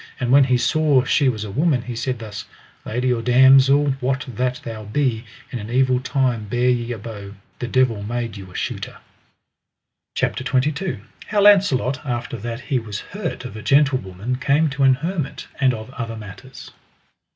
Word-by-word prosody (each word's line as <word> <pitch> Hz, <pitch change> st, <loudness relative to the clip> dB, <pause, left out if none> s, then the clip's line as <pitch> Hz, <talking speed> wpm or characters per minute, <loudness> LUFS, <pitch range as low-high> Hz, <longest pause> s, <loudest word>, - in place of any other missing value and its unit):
And 125 Hz, -1 st, -1 dB
when 140 Hz, 0 st, +7 dB
he 125 Hz, -1 st, +2 dB
saw 145 Hz, 0 st, +3 dB
she 140 Hz, 0 st, +2 dB
was 110 Hz, -4 st, -3 dB
a 105 Hz, -, -6 dB
woman, 140 Hz, -, +1 dB
he 120 Hz, -1 st, -6 dB
said 125 Hz, +2 st, -2 dB
thus: 105 Hz, -3 st, -7 dB, 0.4 s
Lady 125 Hz, +3 st, 0 dB
or 115 Hz, -, -2 dB
damosel, 135 Hz, +3 st, +5 dB
what 130 Hz, 0 st, -1 dB
that 125 Hz, +1 st, -2 dB
thou 110 Hz, -2 st, -6 dB
be, 115 Hz, +1 st, -1 dB, 0.3 s
in 125 Hz, -, -4 dB
an 105 Hz, +1 st, -7 dB
evil 130 Hz, +1 st, +2 dB
time 130 Hz, -4 st, 0 dB
bear 120 Hz, +4 st, +1 dB
ye 120 Hz, -1 st, -1 dB
a 120 Hz, -, -3 dB
bow; 105 Hz, -2 st, -9 dB, 0.2 s
the 120 Hz, -, -3 dB
devil 120 Hz, -4 st, +1 dB
made 115 Hz, +1 st, -4 dB
you 95 Hz, -2 st, -9 dB
a -, -, -15 dB
shooter. -, -, -4 dB, 1.2 s
CHAPTER -, -, -1 dB
XXII. 140 Hz, -, -1 dB, 0.3 s
How 205 Hz, -1 st, +1 dB
Launcelot 150 Hz, -11 st, +4 dB
after 120 Hz, -3 st, -4 dB
that 115 Hz, +3 st, -5 dB
he 135 Hz, -4 st, -1 dB
was 105 Hz, -3 st, -6 dB
hurt 185 Hz, -9 st, -4 dB
of 125 Hz, -, -7 dB
a 110 Hz, -, -7 dB
gentlewoman 125 Hz, -5 st, +1 dB
came 145 Hz, +4 st, +2 dB
to 140 Hz, 0 st, -4 dB
an 135 Hz, -1 st, +6 dB
hermit, 160 Hz, +1 st, -4 dB
and 130 Hz, -2 st, +4 dB
of 110 Hz, +1 st, -7 dB
other 115 Hz, -4 st, -5 dB
matters. 110 Hz, +5 st, -11 dB
125 Hz, 180 wpm, -21 LUFS, 115-135 Hz, 1.2 s, when